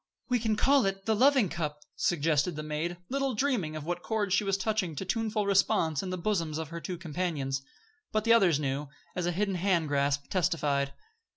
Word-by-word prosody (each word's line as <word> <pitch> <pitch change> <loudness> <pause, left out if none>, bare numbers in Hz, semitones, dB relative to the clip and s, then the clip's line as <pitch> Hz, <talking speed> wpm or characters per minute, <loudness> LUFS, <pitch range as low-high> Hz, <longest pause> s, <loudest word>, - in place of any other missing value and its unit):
"We 250 -1 +2
can 220 -1 +1
call 270 +2 +4
it 195 0 -3
'the 220 - +2
Loving 260 -1 +5
Cup,'" 150 -3 -4
suggested 160 0 +1
the 155 - -4
maid, 155 +3 -3
little 275 -1 0
dreaming 210 - 0
what 170 +3 -3
chords 210 -3 -1
she 205 - +3
was 195 -1 +1
touching 195 -4 -1
to 190 - -4
tuneful 215 0 0
response 170 -6 +2
in 190 - -5
the 185 - -2
bosoms 170 -5 -1
of 160 -2 -4
her 170 0 -6
two 180 0 -4
companions. 155 -5 -2 0.5
But 215 -1 +1
the 230 +1 +5
others 185 -10 +4
knew, 140 0 -2 0.3
as 180 -1 -1
a - - +2
hidden 195 +3 0
hand 175 -4 +1
grasp 140 0 +1
testified. 150 -7 +1
175 Hz, 195 wpm, -29 LUFS, 155-210 Hz, 0.5 s, Loving